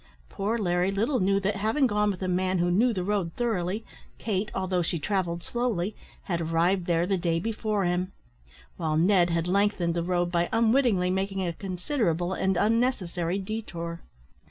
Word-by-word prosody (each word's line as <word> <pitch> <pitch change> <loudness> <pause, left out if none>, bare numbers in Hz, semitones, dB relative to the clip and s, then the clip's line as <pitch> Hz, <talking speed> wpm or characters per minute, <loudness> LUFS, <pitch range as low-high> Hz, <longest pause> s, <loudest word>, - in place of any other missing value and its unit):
Poor 210 +4 -1
Larry 180 -3 +1
little 225 +7 +1
knew 195 +1 +2
that, 200 +1 0
having 220 +8 +2
gone 210 -3 +2
with 190 -2 -3
a - - -1
man 185 +1 +1
who 175 0 +1
knew 230 +7 +3
the 185 -5 -2
road 190 -4 -1
thoroughly, 215 -3 -1 0.3
Kate, 210 -1 -2
although 185 -1 0
she 170 0 -1
travelled 175 0 -1
slowly, 220 -5 -1 0.3
had 170 -3 -2
arrived 170 +3 +1
there 170 -1 +2
the 195 +1 +1
day 170 -1 0
before 215 0 -1
him; 180 +2 0 0.7
while 155 -2 0
Ned 175 +1 +4
had 170 0 0
lengthened 190 -3 +1
the 170 - -1
road 175 0 0
by 170 -1 +1
unwittingly 225 -5 +3
making 190 0 -1
a 170 - -2
considerable 180 - -1
and 190 -1 0
unnecessary 195 -5 +1
detour. 185 -5 -5
185 Hz, 170 wpm, -27 LUFS, 175-210 Hz, 0.7 s, Ned